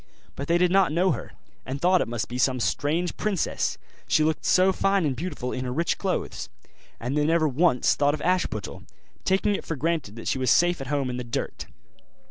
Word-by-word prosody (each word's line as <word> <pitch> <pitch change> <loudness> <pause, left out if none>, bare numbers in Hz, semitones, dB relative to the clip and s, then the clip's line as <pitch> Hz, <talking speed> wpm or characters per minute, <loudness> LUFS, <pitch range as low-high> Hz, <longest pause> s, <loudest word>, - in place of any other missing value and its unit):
But 140 - -5
they 170 - +3
did 180 0 +3
not 190 -4 +4
know 180 +4 +2
her, - - -5 0.3
and 135 +2 -5
thought 180 +3 +4
it - - -1
must 115 -3 -3
be 125 +1 -5
some 130 0 +2
strange 160 +8 -1
princess, 205 -5 -1 0.3
she 155 - +3
looked 155 0 0
so 185 +1 +4
fine 195 -2 +1
and 140 -3 0
beautiful 130 -4 -4
in 130 - -3
her 125 - -3
rich 165 +7 0
clothes; 190 -2 -3 0.5
and 125 +4 -3
they 150 - +2
never 160 +1 +3
once 145 -2 +3
thought 145 +1 +2
of - - -9
Ashputtel, 185 0 -1 0.4
taking 195 +2 +2
it - - -3
for 165 - -4
granted 155 -7 -2
that 115 - -8
she 130 - 0
was 130 -2 +1
safe 175 +2 +3
at 135 - -6
home 140 -2 -1
in 125 - -4
the 125 - -4
dirt. 120 +3 -4
155 Hz, 215 wpm, -25 LUFS, 130-180 Hz, 0.5 s, not